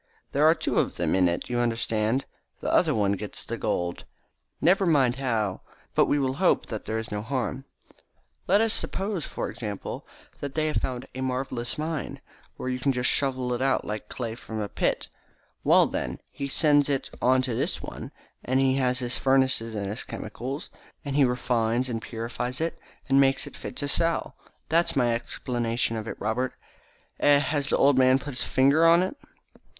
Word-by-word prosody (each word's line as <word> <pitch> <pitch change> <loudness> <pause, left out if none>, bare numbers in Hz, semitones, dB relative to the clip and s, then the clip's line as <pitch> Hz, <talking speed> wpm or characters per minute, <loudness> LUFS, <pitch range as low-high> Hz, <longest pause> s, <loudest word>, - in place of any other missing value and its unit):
There 150 +3 +4
are 160 - +6
two - - 0
of - - 0
them - - 0
in 95 -1 +4
it, 85 - -3
you 120 -1 -1
understand. 115 +1 0 0.3
The - - -2
other - - +4
one 100 -2 +2
gets 100 - -4
the - - -3
gold. 85 0 -2 0.6
Never 190 +2 +4
mind 135 -6 +3
how, 110 -8 -1 0.3
but - - +4
we 145 - +2
will 135 -1 0
hope 185 - +3
that 110 -3 -6
there 110 - -2
is 110 0 -5
no 105 0 -2
harm. 130 +2 -3 0.8
Let 200 +3 +5
us 225 -1 +2
suppose, 195 -5 -2
for - - -3
example, 105 -4 -6 0.3
that 140 -1 -5
they 155 -1 +1
have 155 - 0
found 125 -1 -2
a 130 - -5
marvellous 130 -2 -2
mine, 155 0 -3 0.4
where - - -5
you 125 0 -2
can 135 +2 +2
just 125 -1 +1
shovel 130 -3 0
it 120 - -2
out 135 0 +1
like 105 0 -5
clay 115 -3 -4
from 110 -1 -7
a 105 - -2
pit. - - -1 0.6
Well, - - +6
then, - - -3
he 140 - -4
sends 145 0 +3
it 135 -2 -1
on 130 +1 +4
to 130 -2 -1
this - - -1
one, - - -7 0.3
and 130 +1 +1
he 135 0 +3
has 125 -1 +1
his 125 -1 -2
furnaces 130 -4 +2
and 100 -1 -2
his 105 +5 -4
chemicals, 125 +6 -6 0.3
and 140 -1 -3
he 145 - +5
refines 125 -1 +1
and 115 -2 -3
purifies 115 +3 -4
it 165 +1 -2 0.3
and 135 0 +5
makes 135 0 +2
it - - -10
fit - - -7
to 145 - -2
sell. 165 +3 +1 0.3
That's 165 +1 +2
my 120 -3 +3
explanation 120 0 -1
of 110 0 -4
it, - - -6
Robert. 125 +5 -1 0.6
Eh, 145 -1 +6
has 145 0 0
the - - +2
old 140 -1 +5
man 130 0 +6
put 140 +1 -6
his 125 - -2
finger 140 +5 +4
on 170 +2 +6
it?" 190 - -3
130 Hz, 195 wpm, -26 LUFS, 115-140 Hz, 0.8 s, are